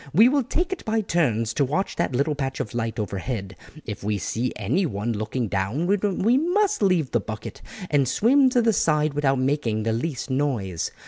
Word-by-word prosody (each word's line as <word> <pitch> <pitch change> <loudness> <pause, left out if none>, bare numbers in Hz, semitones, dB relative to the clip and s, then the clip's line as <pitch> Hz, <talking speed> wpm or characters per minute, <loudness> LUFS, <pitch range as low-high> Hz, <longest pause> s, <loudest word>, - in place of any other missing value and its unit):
We 225 +7 +7
will 285 +1 +2
take 335 +9 -1
it 375 - -8
by 220 0 0
turns 120 - 0
to 140 - +1
watch 155 +9 -1
that 125 - -1
little 140 +4 +1
patch 135 -2 -3
of 105 - -4
light 115 -1 -2
overhead; 100 -1 -4 0.3
if 105 -2 -6
we 105 0 0
see 115 +5 -2
anyone 115 - -1
looking 110 +3 -2
down 100 - -1
we 205 +5 +2
must 375 - +1
leave 180 -8 +2
the 120 - +2
bucket 110 +1 -7 0.3
and 140 -3 +3
swim 260 - +4
to 250 -2 +2
the 225 -1 +3
side 150 -4 +2
without 140 -2 +1
making 130 -5 0
the 110 0 0
least 135 +2 -3
noise. 120 - -1
135 Hz, 190 wpm, -24 LUFS, -, 0.3 s, We